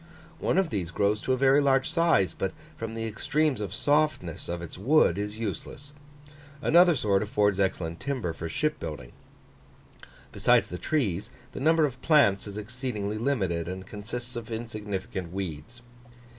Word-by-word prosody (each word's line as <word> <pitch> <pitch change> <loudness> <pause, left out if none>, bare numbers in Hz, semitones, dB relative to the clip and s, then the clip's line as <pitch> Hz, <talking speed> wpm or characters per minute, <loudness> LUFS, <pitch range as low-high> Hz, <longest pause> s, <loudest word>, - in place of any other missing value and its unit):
One - - +1
of 190 -3 +2
these 95 -5 -2
grows 100 +4 +1
to 130 - 0
a - - +1
very 135 +2 +5
large 135 -1 +3
size, 165 - +3
but - - -3 0.2
from 115 0 -5
the 115 0 -3
extremes 135 +4 0
of 100 -4 -3
softness 145 - 0
of 85 0 -2
its 85 - -7
wood, 100 - +3
is 105 +1 -3
useless; 115 - -5 0.7
another 175 +3 +5
sort 100 -6 +2
affords 105 -2 +1
excellent 85 -4 -1
timber 125 -12 -2
for 85 0 -6
ship 150 - -1
building. 75 -7 -6 1.2
Besides - - +3
the 90 - -6
trees, 105 - -1 0.2
the - - -7
number 160 +3 +4
of 130 -3 -5
plants 140 -12 +4
is 100 0 -7
exceedingly 110 -2 -4
limited, 95 -10 0
and 95 +1 -5
consists 120 +5 -7
of 120 -1 -6
insignificant 105 -6 -5
weeds. 95 +6 -6
110 Hz, 155 wpm, -27 LUFS, 95-135 Hz, 1.2 s, very